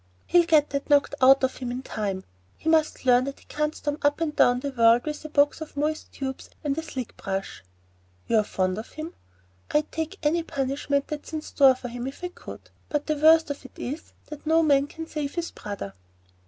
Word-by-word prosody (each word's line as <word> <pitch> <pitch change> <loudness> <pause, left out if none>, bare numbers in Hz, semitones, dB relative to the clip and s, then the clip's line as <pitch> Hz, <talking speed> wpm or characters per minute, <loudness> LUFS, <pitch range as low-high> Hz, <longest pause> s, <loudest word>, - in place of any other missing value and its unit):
"He'll 345 -1 +4
get 305 -3 +4
that 280 +1 -3
knocked 285 -1 +4
out 270 +1 +7
of 260 - 0
him 250 -2 -4
in 250 +2 -4
time. 200 -6 -3 0.3
He - - -9
must 315 -4 +2
learn 250 0 +5
that 275 0 -5
he - - -21
can't 300 +1 -2
storm 290 +1 -3
up 290 +1 +2
and 320 -3 -1
down 245 0 +4
the 280 - -3
world 235 -1 +4
with 300 0 -4
a - - -5
box 290 +1 +2
of 305 -2 -8
moist 305 +2 -2
tubes 265 -1 -5
and 285 -2 0
a 320 - -2
slick 260 -7 -6
brush. 195 0 -4 0.6
You're 220 - +3
fond 185 -1 -1
of 225 - -9
him?" 315 +2 -6 0.6
"I'd 300 0 +1
take 320 +4 -3
any 320 +3 +2
punishment 280 -1 -1
that's 300 +1 -6
in 310 -1 -3
store 270 -4 +5
for 250 -1 -7
him 245 +1 -5
if 270 +6 -8
I 360 - -2
could; - - -11 0.2
but 295 -1 -1
the 305 - 0
worst 315 +1 +5
of 285 - -6
it 260 - -14
is, 290 +6 -6 0.3
no 320 +1 +3
man 280 -2 +4
can 325 +2 -7
save 300 -3 -4
his 340 -1 -3
brother." 200 - -6
285 Hz, 215 wpm, -26 LUFS, 255-310 Hz, 0.6 s, out